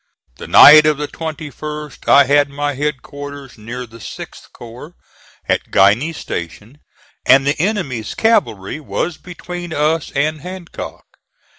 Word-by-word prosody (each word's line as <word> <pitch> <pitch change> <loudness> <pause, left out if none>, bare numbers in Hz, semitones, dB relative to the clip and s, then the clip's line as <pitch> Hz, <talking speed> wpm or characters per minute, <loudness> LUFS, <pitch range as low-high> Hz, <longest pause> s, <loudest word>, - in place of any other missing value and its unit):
The - - -9
night 155 +1 +9
of 155 -2 +2
the 150 0 -3
21st 150 -1 -7
I 140 - +7
had 145 +1 +3
my 145 +1 -3
headquarters 145 -1 -6
near 120 +3 -7
the 115 0 -15
6th - - -10
corps, 125 +9 -12 0.5
at - - -1
Guiney's 115 +12 +3
Station, 105 - -7 0.4
and 135 +1 +5
the 145 +2 0
enemy's 160 - -2
cavalry 120 - 0
was 160 +2 -3
between 175 -1 -8
us 155 +1 0
and 150 +2 0
Hancock. 180 -1 -8
145 Hz, 130 wpm, -17 LUFS, 130-155 Hz, 0.5 s, night